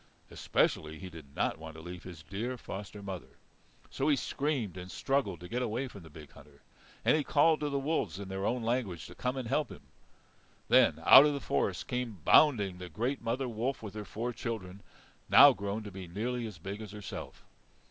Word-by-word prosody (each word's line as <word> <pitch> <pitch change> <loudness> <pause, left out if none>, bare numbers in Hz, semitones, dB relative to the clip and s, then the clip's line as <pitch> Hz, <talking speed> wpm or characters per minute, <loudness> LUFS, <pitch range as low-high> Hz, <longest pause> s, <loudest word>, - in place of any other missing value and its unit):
Especially 80 0 0
he 90 +2 -8
did 75 -4 -12
not - - 0
want 80 0 -9
to - - -9
leave 90 +2 -8
his 85 -4 -10
dear 110 +10 -4
foster 105 -2 -8
mother. 95 -3 -7 0.5
So 135 - -1
he 145 - +5
screamed 135 - -2
and 90 0 -8
struggled 115 - -1
to 90 - -8
get 120 +7 -2
away 125 +3 -1
from 100 -6 -11
the 80 - -13
big 75 -2 -12
hunter, 75 0 -18 0.4
and - - +5
he 155 - +1
called 155 +3 +4
to 150 - -1
the 140 - -1
wolves 135 - -1
in 100 -1 -6
their 95 0 -4
own 120 +3 0
language 115 -7 -1
to - - -10
come 125 +1 -2
and 130 -3 -3
help 145 +5 0
him. - - -11 0.9
Then - - +5
out 145 - +10
of 145 - 0
the - - -2
forest 70 - -1
came 120 -7 -3
bounding 105 -12 +5
the 90 -1 -7
great 120 - -2
mother 120 +3 -1
wolf 120 +2 -3
with 105 - -7
her 105 -1 -5
four 115 +4 -4
children, 100 -5 -5 0.5
now 140 0 +9
grown 100 0 -4
to 105 - -8
be 95 -1 -8
nearly 115 +6 -3
as 105 -5 -9
big 100 +6 -6
as 105 -2 -8
herself. 105 -1 -8
105 Hz, 210 wpm, -31 LUFS, 90-125 Hz, 0.9 s, out